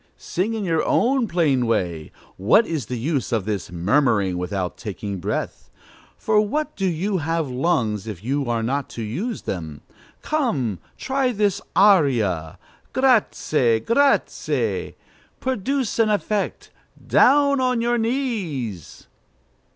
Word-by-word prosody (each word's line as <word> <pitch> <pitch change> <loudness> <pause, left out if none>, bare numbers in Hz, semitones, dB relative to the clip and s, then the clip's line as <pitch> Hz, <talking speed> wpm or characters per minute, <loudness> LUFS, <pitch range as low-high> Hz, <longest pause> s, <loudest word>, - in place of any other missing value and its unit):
Sing 205 +6 -2
in 215 - -3
your 165 -4 +1
own 255 -1 +2
plain 150 - +1
way: 85 -8 -1 0.2
what 115 - +4
is 155 - -3
the 125 - -3
use 140 +3 -2
of 110 -5 0
this 105 -5 -3
murmuring 100 - +2
without 90 0 -3
taking 100 -1 -5
breath? 100 +4 -4 0.5
For 215 -1 +2
what 295 +9 -2
do 195 -1 -1
you 185 +3 -1
have 160 -2 -1
lungs 120 - 0
if 105 -4 -7
you 135 +1 -1
are 115 -1 0
not 135 +4 -2
to 115 - -3
use 185 - -4
them? 80 -6 -5 0.4
Come, 150 - -1 0.2
try 265 -1 0
this 205 -3 0
aria: 120 - +3 0.4
'Grâce,' 155 - +2
'grâce!' 280 +4 +1 0.5
Produce 260 0 -1
an 225 -1 +4
effect! 210 0 -2 0.4
Down 280 -1 +5
on 250 -2 +1
your 240 +1 +1
knees!" 190 - -3
155 Hz, 130 wpm, -22 LUFS, -, 0.5 s, Down